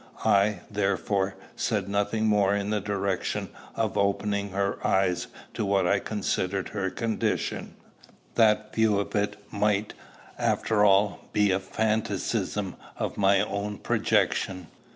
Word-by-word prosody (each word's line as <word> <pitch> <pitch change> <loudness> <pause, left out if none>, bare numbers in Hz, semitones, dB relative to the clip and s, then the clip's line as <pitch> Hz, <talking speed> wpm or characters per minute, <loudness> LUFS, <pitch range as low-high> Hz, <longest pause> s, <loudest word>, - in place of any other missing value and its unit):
I, 100 +1 +3
therefore, 100 -1 0 0.2
said - - -1
nothing 105 +2 0
more 100 -2 +3
in 100 0 -2
the 105 -1 0
direction 100 -2 -2 0.3
of - - 0
opening 100 0 0
her 100 +1 -1
eyes 95 -2 +1 0.3
to - - -2
what 100 -2 +2
I 100 +3 +3
considered 95 -2 -2
her 95 -2 -2
condition: 115 +3 -2 0.6
that 110 -1 +3
view 110 -2 +3
of 100 - -3
it 105 0 0 0.2
might, 105 0 +1 0.5
after 105 -2 +2
all, 100 -1 +3
be 105 -1 +3
but 95 - +3
a - - -4
phantasm 110 +3 -1 0.2
of - - -2
my 100 -1 +4
own 100 0 -3
projection. 90 -3 0
100 Hz, 130 wpm, -27 LUFS, 100-105 Hz, 0.6 s, my